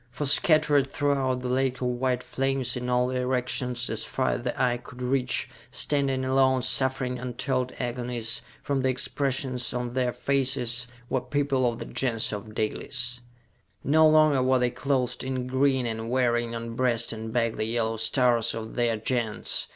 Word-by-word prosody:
For, 145 +4 -4
scattered 145 -1 +3
throughout 135 -3 0
the 125 - -3
lake 130 0 +1
of 125 - -4
white 125 0 -1
flames, 135 -2 -1
in 125 0 -3
all 125 0 +2
directions, 125 -1 0
as 110 0 0
far 130 - -1
as - - -1
the 125 0 -3
eye 125 -1 +2
could 125 +1 -13
reach 125 0 0 0.2
standing 135 -3 0
alone, 130 -1 +3
suffering 130 -1 0
untold 125 +1 -2
agonies, 120 0 -2 0.2
from 140 -2 0
the 130 - +1
expressions 130 -1 0
on 125 -1 -3
their 125 -1 +1
faces 130 -3 +1 0.2
were 130 - 0
people 130 -1 +1
of 115 - -8
the 115 - -6
Gens 115 -4 0
of 105 +1 -7
Dalis! 125 +3 -2 0.6
No 155 +3 +5
longer 155 -3 +5
were 130 0 +3
they 125 -1 +1
clothed 130 -3 -1
in 130 -1 -2
green 130 0 +1
and 115 0 -3
wearing 120 -2 +1
on 115 0 -5
breast 120 -2 +1
and 110 0 -6
back 115 -1 0
the - - -1
yellow 115 0 -1
stars 115 0 +2
of 110 -1 -6
their 120 -2 +1
Gens. 115 0 -1
125 Hz, 165 wpm, -26 LUFS, 120-130 Hz, 0.6 s, No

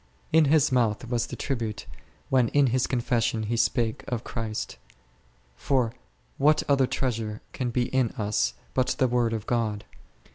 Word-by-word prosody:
In 160 -1 +6
his 145 0 +4
mouth 120 -2 +1
was 120 -1 0
the - - -6
tribute, 115 -6 -3 0.4
when 130 -3 +4
in 145 +4 +3
his 130 -1 +2
confession 115 -3 0
he 110 +2 -1
spake 115 -1 0
of 120 -2 -3
Christ; 110 -2 -4 0.8
for 125 - 0 0.5
what 150 +2 +4
other 135 -2 +3
treasure 115 -5 -2
can 125 -2 -2
be 120 +1 +1
in 130 -3 +2
us 105 -1 0 0.2
but 130 -1 +1
the 130 - +3
Word 120 -1 +1
of 110 -1 -3
God 110 -4 -1
120 Hz, 155 wpm, -26 LUFS, 110-130 Hz, 0.8 s, In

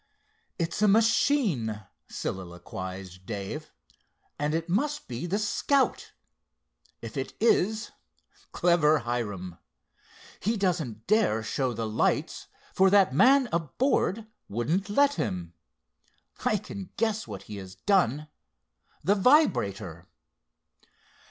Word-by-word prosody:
"It's 170 +2 -2
a 210 - +5
machine," 205 - +2 0.3
soliloquized 95 +1 -6
Dave, 100 -3 -5 0.7
"and 150 +2 0
it 165 +1 -2
must 290 - -1
be 125 +8 -4
the 195 +4 0
Scout. 260 +6 0 0.9
If - - -7
it - - -4
is—clever 180 -6 +1
Hiram! 100 -8 -4 0.8
He 220 +3 0
doesn't 160 - -1
dare 200 - +2
show 130 +3 -1
the 115 -1 -3
lights, 110 - 0 0.3
for 190 0 +5
that 195 -7 +4
man 260 - +5
aboard 195 - 0 0.2
wouldn't 160 - -1
let 285 +7 +4
him. 85 -2 -4 0.9
I 215 - +3
can 195 -1 -8
guess 220 -1 0
what 100 -4 -7
he 105 - -8
has 95 -1 -9
done—the 150 - -2
vibrator." 100 - +2
165 Hz, 100 wpm, -27 LUFS, -, 0.9 s, a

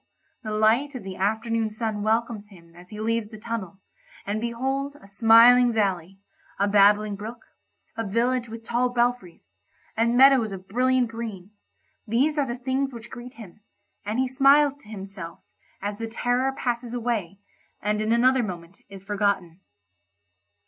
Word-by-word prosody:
the 220 - -6
light 220 +7 +2
of 250 - -6
the 190 -1 -7
afternoon 220 +3 -1
sun 215 -1 -3
welcomes 220 0 -1
him 170 -4 -18
as 175 +1 -15
he 210 - -9
leaves 225 0 -1
the 215 - -10
tunnel, 215 -4 -6 0.5
and 210 +2 -2
behold 270 +4 -3
a - - -17
smiling 230 +4 +6
valley—a 195 -1 -3
babbling 205 +1 +4
brook, 220 +4 -9 0.5
a 225 - -3
village 235 +3 0
with 225 0 -9
tall 245 +2 +1
belfries, 240 -7 -2 0.4
and 235 +2 +2
meadows 260 -5 +6
of 190 -1 -8
brilliant 255 +3 +2
green—these 230 - -4
are 280 - +1
the 240 +1 -4
things 265 +2 -1
which 230 -3 -11
greet 245 +1 -10
him, 215 -2 -13 0.4
and 210 +3 -3
he 260 0 +1
smiles 275 +2 +4
to 280 -7 -20
himself 195 -4 -9 0.4
as 205 +1 -4
the 225 - -3
terror 245 +3 0
passes 240 -2 -3
away 225 -6 -2 0.4
and 210 +1 -1
in 215 +1 -1
another 255 +2 +4
moment 175 -4 -7
is 195 -1 -11
forgotten. 195 -4 -1
225 Hz, 150 wpm, -25 LUFS, 205-245 Hz, 0.5 s, smiling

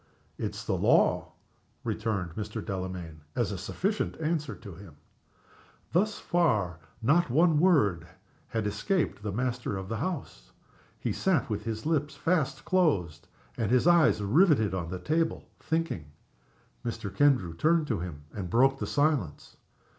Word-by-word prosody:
"It - - -3
is - - -7
the - - 0
law," - - +3 0.5
returned 105 -6 -2
Mr. 105 +3 -5
Delamayn, 90 -5 -5
as 120 -4 0
a 100 - -3
sufficient 195 - -2
answer 155 -1 -1
to 100 -5 -10
him. 85 -3 -13 1.0
Thus 205 +5 +1
far 110 - +1 0.2
not 160 +7 +3
a - - -4
word 150 - +4 0.4
had 110 -2 -2
escaped 165 - -1
the 105 0 -3
master 120 -1 -2
of 95 0 -6
the 115 - -2
house. 120 - -5 0.5
He - - -1
sat 185 -10 +1
with 105 +1 -3
his 110 +1 -4
lips 155 -2 0
fast 155 -5 0
closed 100 - +1 0.3
and 110 -4 -1
his 125 +3 +3
eyes 170 -10 +5
riveted 130 - +4
on 85 -3 -3
the 90 - -4
table, 160 - -1
thinking. 160 - -2 0.8
Mr. 110 -4 -5
Kendrew 125 - +3
turned 160 - +3
to 115 - -1
him, 80 -4 -6
and 95 -4 -5
broke 135 +6 +3
the - - -3
silence. 145 - 0
115 Hz, 145 wpm, -29 LUFS, 95-160 Hz, 1.0 s, eyes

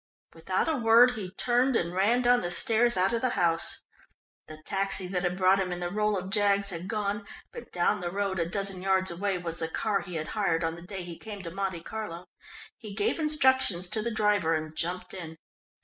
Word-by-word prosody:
Without 185 - -1
a 320 -3 +1
word 235 +1 +6
he 210 -7 -6
turned 245 +1 +2
and 170 -4 0
ran 220 +7 +2
down 245 0 +4
the 175 - -3
stairs 230 +4 +3
out 190 +5 +2
of 230 - 0
the 255 - +1
house. 165 -1 +1 0.6
The 155 0 -10
taxi 195 -1 0
that 180 0 -2
had 180 0 -1
brought 190 +1 +4
him 185 -1 -1
in 175 - -4
the 175 0 -3
role 210 0 +1
of 185 +1 -5
Jaggs 200 -1 +3
had 175 +1 -6
gone, 210 0 -2 0.3
but 475 - -10
down 175 0 +1
the 175 - -2
road, 195 0 -2
a 170 0 -1
dozen 195 -1 -2
yards 190 -1 +2
away, 190 +2 -1
was 170 -1 -5
the 160 - -1
car 200 +5 -1
he 180 -3 -8
had 155 -1 -4
hired 180 -6 0
on 165 0 -1
the 170 - -10
day 185 +1 -7
he 175 -1 -9
came 205 -3 -8
to 170 - -6
Monte 190 -2 -3
Carlo. 185 -5 -6 0.5
He 215 -5 -9
gave 205 +9 0
instructions 260 - +3
to 215 - -1
the 235 - -2
driver 210 -7 +2
and 155 0 -5
jumped 175 +3 -3
in. 160 -3 -8
195 Hz, 220 wpm, -28 LUFS, 175-215 Hz, 0.6 s, word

